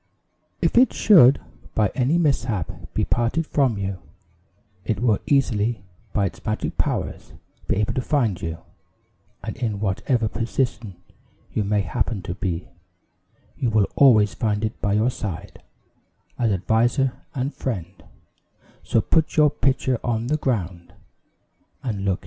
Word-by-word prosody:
"If -, -, +4 dB
it 255 Hz, -, +4 dB
should, 150 Hz, -, +6 dB, 0.4 s
by 105 Hz, -3 st, +2 dB
any 135 Hz, +6 st, +2 dB
mishap, 125 Hz, -, 0 dB, 0.2 s
be -, -, +1 dB
parted 120 Hz, +7 st, 0 dB
from 135 Hz, -8 st, +1 dB
you, 95 Hz, -1 st, -3 dB, 0.8 s
it 105 Hz, -1 st, -1 dB
will 115 Hz, -3 st, +2 dB
easily, 120 Hz, -6 st, +1 dB, 0.3 s
by 100 Hz, -, +1 dB
its -, -, -6 dB
magic 110 Hz, 0 st, -2 dB
powers, -, -, -2 dB, 0.3 s
be -, -, +1 dB
able 105 Hz, +1 st, 0 dB
to 130 Hz, -, -1 dB
find 115 Hz, -, 0 dB
you; 80 Hz, 0 st, -4 dB, 0.9 s
and -, -, -5 dB
in 110 Hz, -5 st, -2 dB
whatever 110 Hz, +4 st, 0 dB
position 115 Hz, -3 st, -2 dB, 0.6 s
you 110 Hz, -, 0 dB
may 105 Hz, +1 st, +1 dB
happen 100 Hz, 0 st, -2 dB
to 90 Hz, -2 st, -4 dB
be, 90 Hz, -3 st, -3 dB, 0.9 s
you 125 Hz, -, 0 dB
will 110 Hz, -2 st, +3 dB
always 110 Hz, -7 st, +5 dB
find 105 Hz, -1 st, -1 dB
it 110 Hz, -, -5 dB
by 100 Hz, -, +1 dB
your 110 Hz, +4 st, +2 dB
side, 95 Hz, -4 st, -6 dB, 0.8 s
as 115 Hz, -3 st, +2 dB
adviser 115 Hz, +7 st, +2 dB, 0.2 s
and 135 Hz, +2 st, -2 dB
friend; 95 Hz, -7 st, -5 dB, 0.8 s
so 115 Hz, -, +1 dB
put 160 Hz, +8 st, +1 dB
your 150 Hz, -2 st, +6 dB
pitcher 130 Hz, -3 st, 0 dB
on 115 Hz, -2 st, -1 dB
the 150 Hz, +5 st, +1 dB
ground, 95 Hz, -, -3 dB, 0.9 s
and 105 Hz, -6 st, -3 dB
look -, -, +2 dB
into -, -, +4 dB
it." -, -, -5 dB
110 Hz, 145 wpm, -23 LUFS, 100-130 Hz, 0.9 s, should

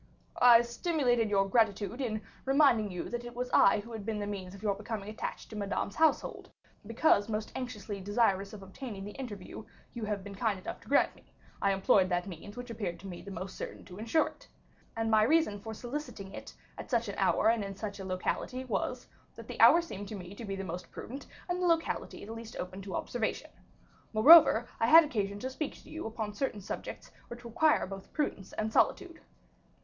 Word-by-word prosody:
"I 240 Hz, -1 st, +8 dB
stimulated 245 Hz, -, +1 dB
your 195 Hz, -1 st, +2 dB
gratitude 220 Hz, +3 st, +1 dB
in 215 Hz, -4 st, -2 dB, 0.2 s
reminding 265 Hz, -6 st, +4 dB
you 180 Hz, -, -4 dB
that 240 Hz, 0 st, -4 dB
it 240 Hz, 0 st, -9 dB
was 250 Hz, +1 st, -3 dB
I 205 Hz, +1 st, +5 dB
who 230 Hz, +3 st, -12 dB
had 220 Hz, -3 st, -6 dB
been 220 Hz, 0 st, -2 dB
the 205 Hz, -, -3 dB
means 195 Hz, -2 st, -6 dB
of 200 Hz, -, -13 dB
your 205 Hz, -2 st, +2 dB
becoming 210 Hz, 0 st, -5 dB
attached 215 Hz, -, -6 dB
to -, -, -7 dB
Madame's 200 Hz, -1 st, -2 dB
household; 320 Hz, -1 st, +1 dB, 0.4 s
because 230 Hz, -2 st, +3 dB
most 215 Hz, 0 st, -3 dB
anxiously 215 Hz, -5 st, -5 dB
desirous 200 Hz, -1 st, +1 dB
of 205 Hz, -2 st, -10 dB
obtaining 195 Hz, 0 st, -7 dB
the 205 Hz, -, -6 dB
interview 215 Hz, -5 st, -7 dB, 0.3 s
you 235 Hz, -3 st, -4 dB
have 205 Hz, -2 st, -3 dB
been 200 Hz, 0 st, -8 dB
kind 205 Hz, 0 st, 0 dB
enough -, -, -7 dB
to -, -, -18 dB
grant 280 Hz, -, +3 dB
me, -, -, -22 dB, 0.3 s
I 200 Hz, -, +3 dB
employed 190 Hz, -1 st, +3 dB
the 175 Hz, -1 st, +2 dB
means 195 Hz, +4 st, -9 dB
which 245 Hz, -1 st, -6 dB
appeared 190 Hz, -7 st, -4 dB
to 195 Hz, -, -9 dB
me 175 Hz, -2 st, -7 dB
most 190 Hz, 0 st, -6 dB
certain -, -, -7 dB
to 180 Hz, +2 st, -11 dB
insure 230 Hz, +9 st, +2 dB
it. -, -, -11 dB, 0.5 s
And 225 Hz, 0 st, -1 dB
my 215 Hz, -1 st, +6 dB
reason 280 Hz, -3 st, +3 dB
for 220 Hz, +2 st, -7 dB
soliciting 240 Hz, -4 st, -6 dB
it, -, -, -9 dB, 0.2 s
at -, -, -7 dB
such 235 Hz, -3 st, +1 dB
an 200 Hz, -, -4 dB
hour 195 Hz, +3 st, +3 dB
and 230 Hz, -2 st, +2 dB
in 195 Hz, 0 st, -6 dB
such 205 Hz, 0 st, -6 dB
a -, -, -5 dB
locality, 190 Hz, +7 st, -3 dB
was, 245 Hz, -, -2 dB, 0.3 s
that -, -, -11 dB
the -, -, -4 dB
hour 340 Hz, -, +8 dB
seemed 205 Hz, -, -7 dB
to 215 Hz, -, -6 dB
me 180 Hz, -1 st, -8 dB
to 225 Hz, +3 st, -8 dB
be 195 Hz, -1 st, -3 dB
the 195 Hz, -, -4 dB
most 180 Hz, 0 st, -6 dB
prudent, 270 Hz, +5 st, -8 dB, 0.2 s
and 360 Hz, 0 st, -2 dB
the 360 Hz, -, +2 dB
locality 330 Hz, -10 st, -1 dB
the 220 Hz, -, -7 dB
least 230 Hz, 0 st, -9 dB
open 185 Hz, +2 st, -6 dB
to 190 Hz, -2 st, -6 dB
observation. 240 Hz, -3 st, -3 dB, 0.6 s
Moreover, 245 Hz, 0 st, +8 dB
I 225 Hz, -, +3 dB
had 325 Hz, +5 st, +9 dB
occasion 205 Hz, -8 st, -2 dB
to 260 Hz, -, -3 dB
speak 290 Hz, +2 st, -4 dB
to -, -, -15 dB
you 320 Hz, -6 st, -5 dB
upon 220 Hz, -2 st, -4 dB
certain 210 Hz, -2 st, -2 dB
subjects 195 Hz, -, -7 dB, 0.2 s
which 240 Hz, 0 st, -10 dB
require 300 Hz, +7 st, +3 dB
both 195 Hz, 0 st, -9 dB
prudence 245 Hz, -10 st, -2 dB
and 215 Hz, 0 st, -2 dB
solitude." 355 Hz, -4 st, +1 dB
215 Hz, 210 wpm, -31 LUFS, 195-245 Hz, 0.6 s, had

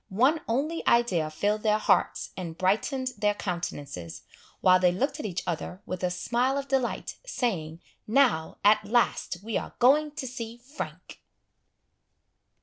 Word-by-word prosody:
One 260 Hz, +11 st, +3 dB
only 290 Hz, +8 st, -1 dB
idea 190 Hz, -10 st, +3 dB
filled 205 Hz, +7 st, 0 dB
their 215 Hz, -1 st, +3 dB
hearts, -, -, +1 dB
and 170 Hz, -3 st, -6 dB
brightened 255 Hz, +8 st, +1 dB
their 210 Hz, 0 st, +2 dB
countenances, 145 Hz, -, -5 dB, 0.4 s
while 185 Hz, 0 st, +5 dB
they 180 Hz, -1 st, +4 dB
looked 275 Hz, -, -1 dB
at 260 Hz, -, -3 dB
each 180 Hz, -3 st, -4 dB
other 175 Hz, +2 st, -4 dB
with 185 Hz, 0 st, -5 dB
a 180 Hz, -, +2 dB
smile 240 Hz, +9 st, 0 dB
of 280 Hz, 0 st, -3 dB
delight, 265 Hz, -2 st, -1 dB
saying, 180 Hz, -, -3 dB, 0.2 s
"now, 220 Hz, -10 st, +2 dB
at 210 Hz, +1 st, +5 dB
last, 210 Hz, -4 st, 0 dB
we 225 Hz, 0 st, -1 dB
are -, -, -9 dB
going 290 Hz, +5 st, +5 dB
to 265 Hz, -, -4 dB
see 235 Hz, -2 st, -6 dB
Frank!" 260 Hz, +5 st, -8 dB
215 Hz, 145 wpm, -27 LUFS, 180-255 Hz, 0.4 s, while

